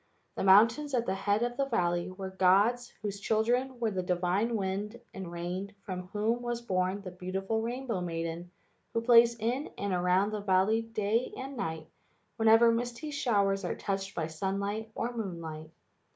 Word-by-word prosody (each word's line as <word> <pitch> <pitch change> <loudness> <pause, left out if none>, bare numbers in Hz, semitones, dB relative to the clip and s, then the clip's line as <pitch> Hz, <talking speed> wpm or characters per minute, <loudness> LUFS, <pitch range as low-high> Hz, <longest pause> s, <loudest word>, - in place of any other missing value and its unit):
The - - -2
mountains 230 +9 +5
at 235 -1 +1
the 190 - 0
head 205 +3 +1
of 240 0 -2
the 275 -1 +1
valley 175 -7 0
were 190 0 -6
gods 200 +6 +3
whose 200 -1 -3
children 240 +5 0
were 225 -2 0
the 190 -2 -1
divine 180 +6 0
wind 205 +3 -3
and 190 -3 -6
rain 180 +4 -4
from 180 -1 -5
whom 215 +5 0
was 240 -1 -2
born 190 -3 -1
the 185 - -6
beautiful 190 +4 -2
rainbow 235 -3 -3
maiden 165 0 -4 0.5
who 230 - +2
plays 235 0 +6
in 240 +6 -1
and 200 -1 -2
around 180 +3 +2
the 210 -1 -3
valley 200 +3 +3
day 225 +1 -1
and 270 +1 -6
night 160 -7 -4 0.5
whenever 225 +1 +6
misty 240 +5 -3
showers 200 -8 +1
are 175 - -2
touched 195 0 -3
by 165 - -1
sunlight 200 +6 -3
or 240 +1 -3
moonlight. 165 -7 -5
200 Hz, 165 wpm, -30 LUFS, 185-230 Hz, 0.5 s, plays